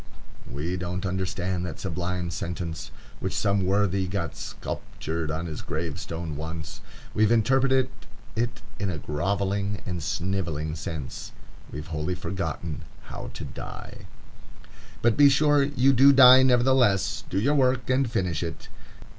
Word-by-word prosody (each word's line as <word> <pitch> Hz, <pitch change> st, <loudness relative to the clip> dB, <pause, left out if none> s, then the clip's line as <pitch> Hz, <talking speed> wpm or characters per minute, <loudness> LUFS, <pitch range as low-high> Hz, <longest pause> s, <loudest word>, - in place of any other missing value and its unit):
_ -, -, -12 dB
We 85 Hz, +6 st, -3 dB
don't 90 Hz, +2 st, -3 dB
understand 95 Hz, -1 st, -2 dB
that 90 Hz, -3 st, -5 dB
sublime 90 Hz, -1 st, -3 dB
sentence 85 Hz, -2 st, -4 dB, 0.3 s
which -, -, -3 dB
some 100 Hz, -2 st, +1 dB
worthy 95 Hz, -1 st, +2 dB
got 90 Hz, -2 st, -3 dB
sculptured 80 Hz, 0 st, -5 dB
on 80 Hz, +2 st, -2 dB
his 80 Hz, -3 st, -5 dB
gravestone 80 Hz, 0 st, -4 dB
once. 80 Hz, 0 st, -6 dB, 0.3 s
We've 110 Hz, +1 st, +3 dB
interpreted 130 Hz, +3 st, +3 dB, 0.5 s
it 120 Hz, 0 st, -2 dB, 0.2 s
in 100 Hz, -1 st, -1 dB
a 85 Hz, -, -3 dB
grovelling 100 Hz, +7 st, -1 dB
and 90 Hz, -2 st, -3 dB
snivelling 85 Hz, -3 st, -2 dB
sense; 75 Hz, -3 st, -6 dB, 0.4 s
we've 75 Hz, 0 st, -6 dB
wholly 75 Hz, +4 st, -1 dB
forgotten 85 Hz, -4 st, -4 dB, 0.3 s
how -, -, -6 dB
to -, -, -5 dB
die. -, -, -9 dB, 1.0 s
But 120 Hz, -1 st, +3 dB
be 145 Hz, -1 st, +8 dB
sure 145 Hz, +1 st, +4 dB
you 135 Hz, -1 st, +3 dB
do 135 Hz, +3 st, +7 dB
die 130 Hz, -1 st, +9 dB
nevertheless. 125 Hz, -5 st, +3 dB
Do 95 Hz, -, 0 dB
your 140 Hz, +8 st, +2 dB
work, 130 Hz, -3 st, +2 dB
and 130 Hz, -1 st, +2 dB
finish 90 Hz, -8 st, -1 dB
it. 85 Hz, -2 st, -6 dB
95 Hz, 140 wpm, -26 LUFS, 85-120 Hz, 1.0 s, die